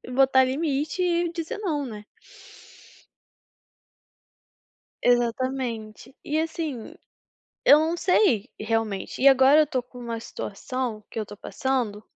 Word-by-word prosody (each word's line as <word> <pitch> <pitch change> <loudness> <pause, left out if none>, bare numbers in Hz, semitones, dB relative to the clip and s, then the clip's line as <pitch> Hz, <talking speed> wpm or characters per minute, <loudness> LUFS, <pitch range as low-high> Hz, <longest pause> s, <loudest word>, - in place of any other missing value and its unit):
botar 265 -1 +5
limite 290 +4 -1
e 345 -1 +1
dizer 330 +3 -4
"não", 310 -9 -2
né. 210 -3 -8 3.0
Exatamente. 240 -1 -1
E 305 +1 -1
assim, 320 -4 -4 0.7
eu 290 - +8
não 325 +2 0
sei 340 - +2
realmente. 220 -2 -2
E 275 - +7
agora 270 +3 +6
eu 305 - +3
tô 260 -3 -2
com 250 0 -15
uma 235 -1 -5
situação 230 +1 -5
que - - -6
eu 215 - -3
tô 205 - -11
passando, 235 -3 -2
260 Hz, 120 wpm, -25 LUFS, 225-305 Hz, 3.0 s, eu